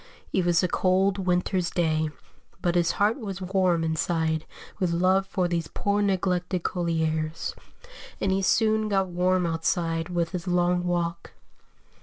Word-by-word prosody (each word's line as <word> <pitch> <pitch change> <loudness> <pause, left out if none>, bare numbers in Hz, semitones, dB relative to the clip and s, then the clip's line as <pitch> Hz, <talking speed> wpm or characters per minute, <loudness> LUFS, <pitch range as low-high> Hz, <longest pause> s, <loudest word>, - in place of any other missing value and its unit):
It 185 - +2
was 175 0 +3
a - - +3
cold 190 +2 +2
winter's 180 0 +1
day, 160 -3 0 0.5
but 175 - 0
his 175 -1 +2
heart 210 +5 +1
was 195 -5 -5
warm 185 -3 +1
inside 160 0 0 0.3
with 185 -3 +1
love 185 +3 +2
for 185 -2 0
these 170 -2 -2
poor 205 0 -1
neglected 185 -2 0
colliers, 160 -2 -1 0.7
and 195 - 0
he 190 +1 +1
soon 215 +2 +2
got 195 -2 +1
warm 180 +1 +1
outside 165 0 -1
with 170 -2 -1
his 180 -1 -5
long 180 0 +1
walk. 170 -1 -2
180 Hz, 145 wpm, -26 LUFS, 170-190 Hz, 0.7 s, was